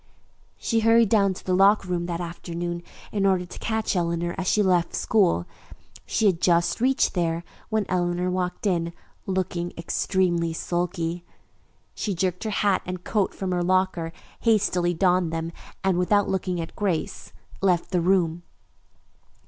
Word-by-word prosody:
She 230 - 0
hurried 225 -1 +5
down 200 -3 +3
to - - -11
the 185 - 0
locker 195 +1 +4
room 175 -1 -1
that 170 -1 -3
afternoon 175 0 -4 0.3
in 205 -2 -1
order 190 -2 +2
to 175 - -10
catch 220 -2 -1
Eleanor 170 0 0
as 190 -1 -4
she 210 - +3
left 180 -3 +2
school. 180 - +2 0.6
She 220 - +1
had 185 -4 +3
just 170 +4 +2
reached 265 +2 +2
there 170 -2 0 0.3
when 220 -2 0
Eleanor 180 0 0
walked 180 +2 -2
in, 170 -3 0 0.3
looking 185 -2 -2
extremely 170 0 0
sulky. 175 0 -2 0.7
She 205 -3 -3
jerked 180 +3 -1
her - - 0
hat 205 -1 +2
and 180 0 -6
coat 205 -2 0
from 190 -1 -3
her 180 -1 0
locker, 185 -2 +1 0.3
hastily 185 -6 +2
donned 180 -1 +2
them, 165 0 -3 0.3
and, 190 -2 +2
without 205 +3 +3
looking 185 -2 -1
at 165 - -6
Grace, 185 -6 -2 0.3
left 180 -3 +1
the 180 -2 +2
room. 175 -2 +2
180 Hz, 155 wpm, -25 LUFS, 170-195 Hz, 0.7 s, hurried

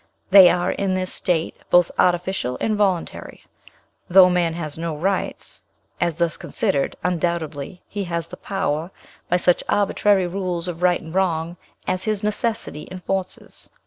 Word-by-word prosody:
They 190 -2 +10
are, 175 0 +1
in 195 -1 -1
this 185 0 -2
state, 165 -3 -1
both 175 -1 +4
artificial 175 -8 +1
and 215 - 0
voluntary. 195 -4 -2 0.6
Though 180 0 +7
man 170 -2 +1
has 155 -4 -5
no 165 -2 -4
rights, 190 +4 -2 0.4
as 170 -2 +1
thus 170 -1 0
considered, 140 - 0
undoubtedly 170 -2 -2
he 200 -1 -4
has 170 -2 -3
the - - -11
power, 165 -4 -2 0.4
by 180 - +3
such 180 0 +2
arbitrary 205 -1 +2
rules 180 -1 -3
of 175 -1 -5
right 180 -1 +3
and 160 0 -10
wrong 170 -3 0 0.3
as 185 0 -1
his 215 -1 -1
necessity 210 -6 -2
enforces." 185 0 -5
180 Hz, 145 wpm, -22 LUFS, 170-190 Hz, 0.6 s, They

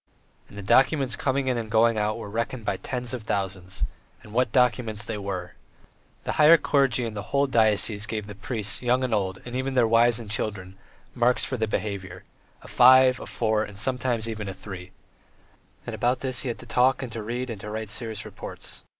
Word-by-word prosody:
And 105 - -13
the 100 - -6
documents 135 +5 +3
coming 135 0 -1
in 125 -2 +1
and 110 -2 -6
going 115 +1 +4
out 105 0 0
were 115 - -7
reckoned 115 +2 -3
by 100 -2 -1
tens 125 +2 -4
of 125 - -4
thousands; 95 -3 -3 0.4
and 105 - -13
what 125 -1 +1
documents 120 -4 +1
they 110 -2 -4
were! 95 -3 -5 0.7
The - - -2
higher 160 +3 +9
clergy 135 -5 +2
in 115 - -4
the 105 - -4
whole 140 +2 +2
diocese 110 -4 +2
gave 110 -2 -3
the 105 - -8
priests, 105 0 -2
young 125 +1 +2
and 125 -3 -1
old, 95 -3 0
and 120 0 -6
even 130 +1 -2
their 120 -3 +4
wives 115 +1 +4
and 115 -3 -8
children, 100 -3 -3 0.4
marks 120 0 +2
for 130 - -2
their 110 -3 -1
behaviour 95 -4 -4 0.4
a - - -12
five, 130 0 +6
a - - -8
four, 110 -2 0
and 105 -2 -8
sometimes 120 0 0
even 110 -3 -4
a 95 - -6
three; 95 -2 -9 1.0
and - - -5
about 125 +1 0
this 130 -2 0
he 135 - -3
had 120 - -3
to - - -10
talk 130 +2 +2
and 125 - -6
to 115 - -5
read 120 +3 -4
and 105 -4 -7
write 110 0 -5
serious 110 -2 -6
reports. - - -9
115 Hz, 205 wpm, -25 LUFS, 105-125 Hz, 1.0 s, higher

